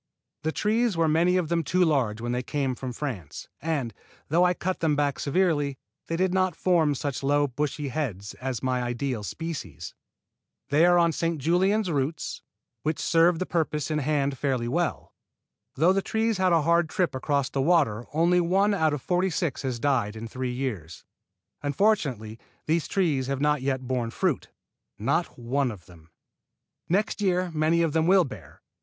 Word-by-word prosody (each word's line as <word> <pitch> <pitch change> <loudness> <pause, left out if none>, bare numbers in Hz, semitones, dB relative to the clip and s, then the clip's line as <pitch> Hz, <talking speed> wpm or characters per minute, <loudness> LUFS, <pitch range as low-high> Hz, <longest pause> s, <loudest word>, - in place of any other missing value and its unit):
The 160 +1 -1
trees 215 +1 +1
were 165 -1 +3
many 170 +4 +3
of 170 -4 -1
them 170 -1 +1
too 180 +5 +2
large 125 -9 +1
when 120 +1 -2
they 125 0 -1
came 135 +1 -1
from 125 0 -5
France, 120 - -6
and, 145 -8 -2 0.4
though 170 +4 +4
I 180 0 +3
cut 185 +2 -2
them 155 -3 +2
back 145 -1 0
severely, 145 -3 +1 0.3
they 165 - -2
did 185 +1 +1
not 185 -3 +1
form 165 -5 +2
such 140 0 -3
low 145 +1 +2
bushy 145 +2 -3
heads 110 - -4
as 130 -3 -3
my 130 -1 0
ideal 120 -1 -2
species. 135 - -6 0.8
They 155 +5 +5
are 175 0 +5
on 170 -1 +4
St. 165 0 -1
Julien 185 +8 +2
roots, 155 -4 -2 0.4
which 155 0 -1
serve 165 +1 +3
the 185 - -2
purposes 155 -4 -1
in 155 - +1
hand 140 -2 0
fairly 130 -4 0
well. 170 +7 -2 0.6
Though 170 +6 +4
the 195 - +1
trees 220 0 0
had 185 -1 +3
a 165 -3 +4
hard 170 +1 +3
trip 180 +1 0
across 140 +1 -1
the 135 - 0
water 135 -8 +2
only 170 +4 +3
one 195 +4 +2
out 160 -6 +2
of 135 - -8
forty 180 +1 +1
six 165 -5 -2
has 130 -3 -2
died 120 -6 0
in 110 +1 -6
three 125 +2 -4
years. 105 - -5 0.6
Unfortunately 140 - 0 0.3
these 160 +1 0
trees 155 -10 0
have 135 -1 -2
not 150 -1 +2
yet 130 -1 -1
borne 125 -2 -2
fruit, - - -1 0.5
not - - -1
one 130 +3 0
of 100 -7 -9
them. 85 -2 -17 0.8
Next 205 +4 0
year 185 -2 +1
many 160 +2 +2
of 160 -3 0
them 160 0 +2
will 190 0 +6
bear. 130 - -11
150 Hz, 180 wpm, -26 LUFS, 130-175 Hz, 0.8 s, will